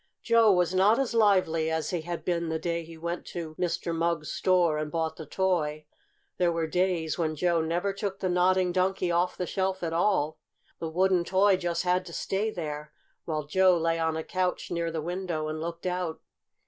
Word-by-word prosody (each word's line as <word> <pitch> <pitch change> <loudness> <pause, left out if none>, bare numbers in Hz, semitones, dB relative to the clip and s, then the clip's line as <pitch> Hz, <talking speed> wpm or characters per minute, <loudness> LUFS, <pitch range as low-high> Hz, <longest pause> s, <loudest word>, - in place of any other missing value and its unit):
Joe 230 -2 +5
was 180 -1 +2
not 200 +4 +4
as 270 -3 0
lively 185 -8 +3
as 160 -2 -1
he 175 -3 -1
had 170 +1 -5
been 170 -2 0
that 160 0 -3
day 170 -1 -1
he 165 0 -11
went 170 +2 -4
to 165 -3 -6
Mr. 170 -1 -1
Mugg's 165 -2 -1
store 175 -4 +2
and 155 0 -3
bought 160 0 -1
the 160 - -9
toy. 155 -5 0 0.5
There 175 -1 +3
were 165 -1 -1
days 175 -1 0
when 155 -2 0
Joe 170 +1 +2
never 175 +5 -1
took 195 -1 -3
the 185 - -1
Nodding 180 0 +3
Donkey 185 0 +1
off 175 +1 +1
the 180 - -2
shelf 190 0 -2
at 165 -1 -2
all. 165 -3 +1 0.4
The 165 - -3
wooden 185 +1 +2
toy 190 +2 +4
just 175 -1 -2
had 180 0 +2
to 170 - -9
stay 200 +6 -1
there, 150 -6 -5 0.3
while 155 -2 -2
Joe 185 +3 +4
lay 165 0 0
on 160 -1 0
a 160 - -3
couch 185 +1 -2
near 170 -1 -1
the 160 -2 -4
window 175 -3 -3
and 155 0 -4
looked 170 +1 -5
out. 180 -3 -2
175 Hz, 200 wpm, -28 LUFS, 160-185 Hz, 0.5 s, Joe